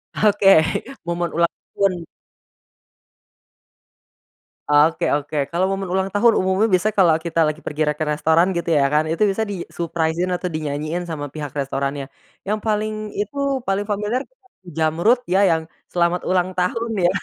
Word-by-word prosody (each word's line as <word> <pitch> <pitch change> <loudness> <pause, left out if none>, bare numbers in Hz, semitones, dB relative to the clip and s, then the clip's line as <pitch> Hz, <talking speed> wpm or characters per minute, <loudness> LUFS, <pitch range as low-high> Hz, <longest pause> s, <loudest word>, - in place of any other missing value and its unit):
Oke 205 -2 +3 0.6
momen 170 0 -1
ulang 170 0 +2 0.2
tahun. 185 -4 +1 2.7
Oke 150 +2 +3
oke 145 -1 -1
kalau 175 +2 +1
momen 195 -1 -2
ulang 190 +1 -1
tahun 225 +2 +4
umumnya 190 +4 +2
biasa 195 +3 +2
kalau 175 -6 +4
kita 165 0 -1
lagi 155 0 0
pergi 150 +1 -4
re - - +1
ke 155 - -1
restoran 160 +4 +2
gitu 170 0 -3
ya 140 - +3
kan 155 +1 +2
itu 165 +6 +1
bisa 200 +2 0
di-suprise-in 170 -4 -2
atau 180 -1 -2
dinyanyiin 155 +2 -3
sama 150 -3 -4
pihak 150 -2 -5
restorannya, 140 0 -2 0.4
yang 210 +2 -1
paling 215 0 -2
itu 210 +7 -3 0.3
paling 195 +1 0
familiar 210 +5 -1
itu - - -16 0.2
Jamrud 170 +6 +1
ya, 190 +3 +2
yang 165 -5 +2 0.2
"Selamat 175 0 +1
Ulang 185 0 +1
Tahun" 225 +6 -1
ya 180 -4 +2
175 Hz, 150 wpm, -21 LUFS, 160-200 Hz, 2.7 s, tahun